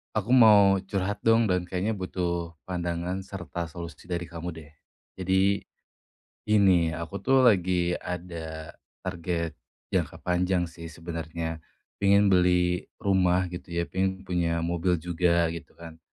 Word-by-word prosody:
Aku 110 +2 -1
mau 105 -6 +7
curhat, 100 +1 -3
dong, 115 -1 +4
dan 90 -1 +1
kayaknya 95 +4 -2
butuh 85 -2 -3 0.2
pandangan 90 +1 -3
serta 90 -3 -5
solusi 85 -2 -9
dari 90 -1 -4
kamu, 85 +1 -6
deh. 80 -2 -11 0.5
Jadi, 95 +2 +1 0.8
gini, 95 -6 +4
aku, 85 +4 -5
tuh, 130 +6 +3
lagi 90 -6 +3
ada 85 -3 -6 0.3
target 85 -3 -3 0.3
jangka - - -2
panjang, 90 -1 0
sih, 85 0 -10
sebenarnya. 80 0 -5 0.4
Pengin 100 0 +4
beli 90 -1 +3 0.2
rumah, 90 -2 +2
gitu, 90 0 -7
ya, 85 - +1
pengin 95 +2 -2
punya 85 -3 -1
mobil 85 +1 +1
juga, 85 0 +1
gitu, 85 0 -8
kan. 80 -1 -11
90 Hz, 130 wpm, -27 LUFS, 85-95 Hz, 0.8 s, mau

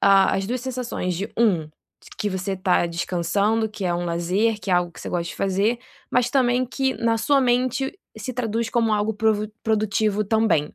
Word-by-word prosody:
a 195 -1 +5
as 195 0 -2
2 250 +3 -2
sensações 245 -7 -3
de 195 +4 -4
1, 185 -10 +2 0.5
que 210 - 0
você 190 +1 -2
está 185 -2 +2
descansando, 185 +6 0
que 215 -2 -6
é 175 -1 +1
um 175 0 -2
lazer, 180 +6 0
que 190 - -4
é - - +4
algo 175 -1 +1
que - - -12
você - - -6
gosta 175 -1 -1
de - - -9
fazer, 200 +5 +1 0.3
mas 250 0 +2
também 255 -2 +2
que 265 +1 -1
na 230 -1 +1
sua 275 +5 +3
mente, 255 +5 0 0.2
se 255 - -5
traduz 230 -2 -1
como 230 -2 +2
algo 210 +1 +1
pro 215 0 +1
produtivo 215 -1 +1
também. 205 -8 +1
215 Hz, 195 wpm, -23 LUFS, 185-235 Hz, 0.5 s, a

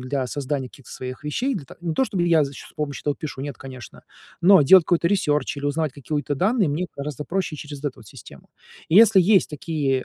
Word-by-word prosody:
для 130 0 -2
создания 135 0 -3
каких-то 135 - -16
своих 130 +2 -7
вещей. 245 - -1
Для 150 - -5
та - - -14
не 170 -2 -3
то, 265 - +2
чтобы 190 -6 -1
я 165 -3 +4
значит 140 0 -6
с - - -19
помощью 150 -2 -4
этого 145 -1 0
пишу, 145 -3 -7
нет, 145 -2 -6
конечно. 130 -3 -11 0.4
Но, 190 +1 +7
делать 180 +4 +7
какой-то 170 -1 +1
ресерч 150 -7 0
или 140 - -3
узнавать 150 0 -1
какие-то 145 +1 -3
данные, 195 - +1
мне 165 +6 -2
гораздо 145 +1 -5
проще 185 -3 -2
через 145 -1 -9
эту, 140 - -4
вот, 110 - -15
систему. - - -14 0.4
И, 165 - +3
если 215 -3 +7
есть 195 +2 +4
такие, 145 -4 -2
150 Hz, 220 wpm, -23 LUFS, 140-175 Hz, 0.4 s, Но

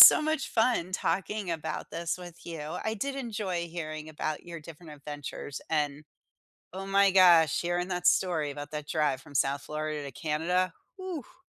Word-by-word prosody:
so - - +12
much 310 -2 0
fun 225 -6 +2
talking 195 +1 -1
about 160 -1 -4
this 170 +1 -2
with 175 -2 -10
you. 165 -2 -6 0.3
I 220 - 0
did 270 +6 -2
enjoy 205 -9 -2
hearing 155 -2 -5
about 155 0 -3
your 170 -1 -7
different 160 0 -11
adventures, 145 -1 -6
and, 150 -1 0 0.7
oh 190 +1 -5
my 195 0 +5
gosh, 175 -5 +7
sharing 175 +1 0
that 180 -1 -1
story 160 -7 +3
about 145 0 -7
that 150 -1 -5
drive 150 -4 +1
from 145 - -14
South 140 +1 +2
Florida 155 -1 -3
to 140 - -6
Canada, 165 +6 0 0.3
oof! 360 -1 -7
170 Hz, 165 wpm, -29 LUFS, 150-190 Hz, 0.7 s, so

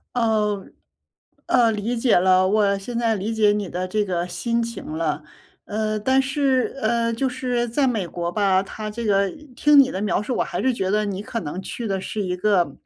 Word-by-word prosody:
嗯。 215 -4 0 0.7
呃， 235 -3 +4
理 220 +4 -2
解 230 +1 +3
了， 185 +1 +4
我 200 0 +2
现 230 +4 -5
在 225 -2 +1
理 210 +3 -3
解 215 -2 +4
你 205 -1 -1
的 180 +2 -3
这 210 +2 0
个 175 -2 -1
心 230 +6 -1
情 230 0 -6
了。 155 -2 -1 0.4
呃， 215 0 -2
但 260 +5 +2
是 270 -1 0
呃， 230 +1 +1
就 265 +4 0
是 250 -2 -1
在 270 +5 +1
美 215 -7 -1
国 170 0 -4
吧， 195 -1 +2
它 215 +2 -6
这 230 +2 -5
个 200 -1 +2 0.3
听 295 -1 +5
你 265 -1 +5
的 190 - -4
描 210 0 0
述， 245 +4 -3
我 - - +2
还 180 - -4
是 260 +3 +2
觉 190 -5 -2
得 210 +1 +2
你 200 -1 -3
可 230 +2 -4
能 165 +3 -5
去 235 +4 -6
的 195 -1 -1
是 210 +2 -4
一 180 -2 -2
个 180 -8 +1
210 Hz, 225 characters per minute, -22 LUFS, 190-235 Hz, 0.7 s, 听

